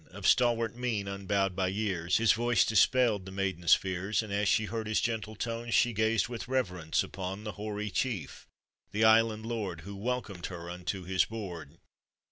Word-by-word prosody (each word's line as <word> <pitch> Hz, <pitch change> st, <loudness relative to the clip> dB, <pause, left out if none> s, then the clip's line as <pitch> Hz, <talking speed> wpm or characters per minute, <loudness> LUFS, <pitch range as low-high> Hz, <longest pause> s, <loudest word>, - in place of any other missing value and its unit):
Of -, -, -9 dB
stalwart 115 Hz, -2 st, +3 dB
mien 115 Hz, -5 st, -2 dB
unbowed 100 Hz, -1 st, -1 dB
by 95 Hz, -1 st, +1 dB
years, 95 Hz, -3 st, 0 dB
His 115 Hz, -1 st, +4 dB
voice 120 Hz, -2 st, +3 dB
dispelled 110 Hz, -3 st, +3 dB
the -, -, -7 dB
maiden's 95 Hz, -3 st, +3 dB
fears, 95 Hz, +3 st, -2 dB
And 105 Hz, -2 st, -6 dB
as 100 Hz, 0 st, +1 dB
she 110 Hz, -, +3 dB
heard 110 Hz, 0 st, -4 dB
his 110 Hz, -, +1 dB
gentle 110 Hz, -2 st, -2 dB
tone, 115 Hz, +2 st, -4 dB
She 120 Hz, +1 st, +3 dB
gazed 110 Hz, -1 st, +2 dB
with 120 Hz, -1 st, -6 dB
reverence 90 Hz, -11 st, 0 dB
upon 95 Hz, +2 st, -6 dB
The 105 Hz, -, -4 dB
hoary 105 Hz, 0 st, -4 dB
chief, 110 Hz, -4 st, -3 dB, 0.4 s
the 110 Hz, +2 st, 0 dB
island 110 Hz, 0 st, +4 dB
lord, 105 Hz, -8 st, -3 dB
Who 100 Hz, +4 st, -8 dB
welcomed 105 Hz, -4 st, -3 dB
her 85 Hz, -1 st, -7 dB
unto 90 Hz, +2 st, -4 dB
his 95 Hz, +1 st, +2 dB
board. 90 Hz, -8 st, -7 dB
105 Hz, 175 wpm, -30 LUFS, 95-115 Hz, 0.4 s, His